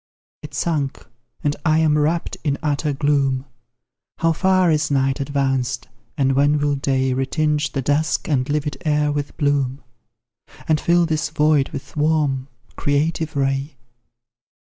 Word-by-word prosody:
It 150 -1 -9
sank, 145 -4 -2 0.4
and 145 0 +1
I 155 -2 +3
am 155 -2 +3
wrapt 155 +3 0
in 145 -2 0
utter 150 0 0
gloom; 140 -2 +1 0.7
How 165 0 +2
far 185 0 +3
is 150 -1 +1
night 135 -1 +1
advanced, 135 -2 -1 0.3
and 135 -2 +2
when 145 +2 +3
will 145 0 +1
day 135 -1 0
Retinge 150 +3 0
the 135 - -2
dusk 150 +3 0
and 135 -2 0
livid 145 -2 -2
air 150 -1 +1
with 145 -1 -4
bloom, 140 -3 0 0.8
And 155 -1 +2
fill 170 0 +3
this 155 -3 -1
void 150 -2 +2
with 135 - -8
warm, 150 -3 +1 0.3
creative 155 +2 0
ray? 135 +1 -1
145 Hz, 140 wpm, -21 LUFS, 135-155 Hz, 0.8 s, I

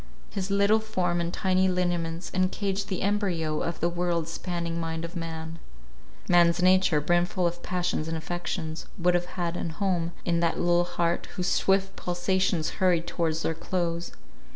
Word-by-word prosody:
His 195 -1 -3
little 200 +2 +4
form 180 -5 -1
and 170 0 -2
tiny 185 0 +2
lineaments 175 -2 -1
encaged 195 +1 0
the 190 -3 -2
embryo 180 -7 0
of 170 - -3
the 170 - +3
world 175 -1 -1
spanning 170 0 -3
mind 165 0 -3
of 170 +2 -8
man. 165 -1 -5 0.7
Man's 170 -1 +5
nature, 185 -3 +4
brimful 175 +4 +1
of 175 0 -1
passions 180 -3 -1
and 165 0 -2
affections, 170 -1 -4
would 180 -1 +3
have 175 0 +1
had 175 -1 -1
an 170 - -2
home 170 -1 -1
in 170 -1 +2
that 170 -1 +1
little 175 0 +3
heart, 170 -1 -1
whose 180 -1 0
swift 195 0 +2
pulsations 180 -1 0
hurried 175 -3 +3
towards 165 -2 -1
their 165 - +1
close. 170 0 -2
175 Hz, 160 wpm, -27 LUFS, 170-185 Hz, 0.7 s, Man's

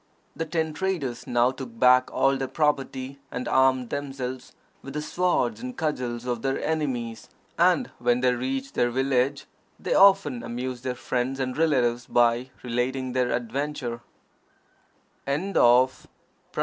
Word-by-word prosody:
The 165 - -3
ten 160 -1 -1
traders 160 -9 -3
now 120 +1 +3
took 130 -3 -9
back 125 +1 +5
all 135 0 +2
their 135 0 -2
property, 140 -3 -1
and 125 - -5
armed 130 -2 +3
themselves 130 -2 -5 0.3
with 135 +1 -9
the 150 - -1
swords 175 - 0
and 255 0 -6
cudgels 125 -7 -2
of 120 -2 -2
their 135 +1 -1
enemies; 130 -8 -2 0.3
and - - +3
when 120 +1 +2
they 125 -1 +3
reached 130 +2 -3
their 120 - +2
village, 130 +2 0 0.3
they - - -1
often 190 -11 +5
amused 125 +1 -5
their 130 -1 -2
friends 125 +2 -2
and 130 -1 -2
relatives 125 -6 +1
by 120 +1 +2
relating 125 +2 -2
their 125 -1 +1
adventure. 125 0 -3
130 Hz, 135 wpm, -26 LUFS, 125-140 Hz, 0.3 s, back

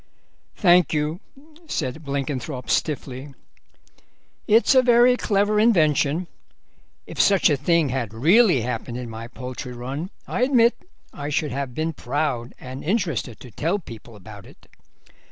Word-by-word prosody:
"Thank 180 - +4
you," 150 +3 -1 0.5
said 150 - -3
Blenkinthrope 140 -2 -4
stiffly; 140 -2 -2 1.1
"it's 225 +5 +5
a 260 - +6
very 245 0 +5
clever 210 -2 +1
invention. 165 - +2 0.8
If - - -1
such 195 -4 +4
a - - +3
thing 155 +2 +1
had 125 -4 -3
really 170 - +4
happened 120 0 -4
in 125 -2 -6
my 115 +1 -7
poultry 125 +1 -7
run 135 +8 -5 0.2
I - - -3
admit 250 -2 +4 0.4
I 145 0 -5
should 150 0 -1
have 135 -1 -4
been 160 +1 -2
proud 130 -3 -3
and 130 +1 -8
interested 165 - -2
to 125 - -11
tell 165 - -1
people 115 - -12
about 105 0 -12
it. - - -19
145 Hz, 135 wpm, -23 LUFS, 125-180 Hz, 1.1 s, a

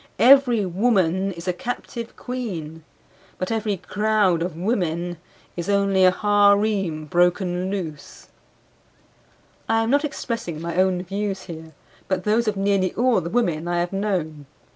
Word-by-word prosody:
Every 245 -4 +5
woman 190 -1 +1
is 170 +1 -10
a 180 - +1
captive 235 +3 -6
queen. 175 -11 -6 0.5
But 185 - -3
every 215 -3 -1
crowd 205 -3 +1
of 175 -1 -3
women 175 -3 -1 0.4
is 175 +2 -4
only 200 -2 +3
a - - +8
harem 200 -4 +2
broken 180 +2 +1
loose. 165 -7 -6 1.4
I 225 0 +3
am 225 - -1
not 285 +2 +3
expressing 230 - -4
my 170 +1 -4
own 185 -1 +2
views 195 +1 -3
here, 160 -2 -10 0.3
but 185 -1 -1
those 220 +3 +1
of 210 -2 0
nearly 195 -2 +1
all 240 -4 +2
the 170 - -5
women 175 -8 0
I 175 0 0
have 175 +2 -2
known. 170 -8 -2
190 Hz, 140 wpm, -23 LUFS, 175-215 Hz, 1.4 s, a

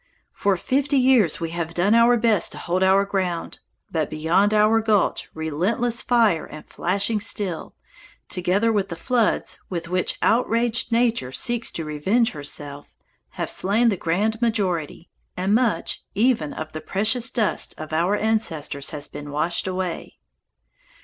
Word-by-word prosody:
For 200 -2 +1
fifty 280 +7 0
years 250 - +4
we 165 -1 -4
have 170 -1 -4
done 190 +5 +2
our 235 +1 +5
best 225 -4 +2
to - - -9
hold 180 +1 -2
our 190 +1 +4
ground, 185 -4 -3 0.3
but 155 -3 -1
beyond 165 +7 +2
our 215 +1 +4
gulch 215 -3 +1
relentless 185 +10 -1
fire 225 -9 +2
and 155 - -11
flashing 200 +5 -1
steel, 200 -5 -2 0.5
together 190 +5 +1
with 200 -2 0
the 170 - -4
floods 230 +6 0
with 170 -2 -4
which 185 0 0
outraged 235 +1 +1
Nature 230 - +1
seeks 240 - 0
to 165 - -4
revenge 195 +11 +1
herself, 145 -1 -6 0.4
have - - -4
slain 220 +5 +2
the 205 - +1
grand 205 +7 -1
majority, 185 - -1 0.3
and 190 +3 0
much, 235 -1 +1
even, 215 - +1
of 155 0 -6
the 155 - -6
precious 225 +9 +1
dust 220 -5 0
of 155 0 -8
our 175 +6 +2
ancestors 210 -11 -1
has 150 -1 -5
been 145 0 -9
washed 165 +6 -1
away." 185 -2 -4
195 Hz, 150 wpm, -23 LUFS, 165-225 Hz, 0.5 s, our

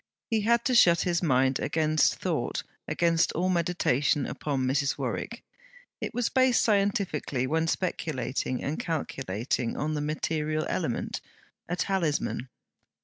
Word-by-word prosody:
He 220 -1 +2
had 235 +2 +2
to 255 - +2
shut 170 -8 +6
his 175 -1 0
mind 130 -4 +2
against 155 -1 +2
thought, - - -2 0.2
against 170 -1 +2
all 180 +3 0
meditation 160 -6 +1
upon 135 -3 -2
Mrs. 140 +2 +1
Warwick; - - -4 0.6
it - - -3
was 245 -1 0
based 260 -2 +3
scientifically 195 - +1
when 160 +4 0
speculating 135 -8 -2
and 145 +3 -2
calculating, 130 - -2
on 155 +1 -1
the 150 - -1
material 155 0 -1
element - - -2 0.5
a 175 - 0
talisman. 165 -9 -1
155 Hz, 130 wpm, -28 LUFS, 140-180 Hz, 0.6 s, shut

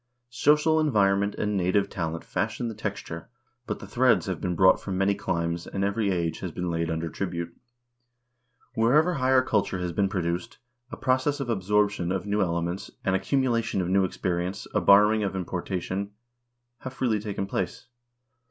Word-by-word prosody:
Social 150 +5 +3
environment 100 -8 +2
and 105 0 -1
native 95 +2 +2
talent 85 -4 -4
fashion 120 - -2
the - - -5
texture, - - -6 0.4
but - - -2
the - - -10
threads - - +3
have - - -4
been 90 -1 -1
brought 95 +2 +5
from 95 -2 -4
many 100 +1 +3
climes, 85 -2 -2
and 100 - -3
every 100 +1 0
age 85 -3 -1
has 90 - -5
been 90 +1 -3
laid 85 0 -1
under 80 0 -2
tribute. 85 -1 -4 1.2
Wherever 150 +10 +3
higher 130 -3 +3
culture 105 -6 0
has 90 -1 -3
been 100 +3 +1
produced, 85 -2 -3 0.3
a - - -6
process 130 +3 +1
of 130 -4 -2
absorption 105 -3 +1
of 95 -1 -2
new 105 +1 0
ele 85 -2 0
ments, 85 +3 -4 0.2
an 95 - +2
accumulation 115 0 +1
of 90 -1 -1
new 95 +1 +3
experience, 90 0 -2
a - - +2
borrowing 105 +2 +6
and 95 -1 -2
importa 90 0 -3
tion, 95 +3 -4 0.7
have 130 - -7
freely 115 -6 +1
taken 100 -2 -3
place. 95 - -3
100 Hz, 170 wpm, -26 LUFS, 90-110 Hz, 1.2 s, borrowing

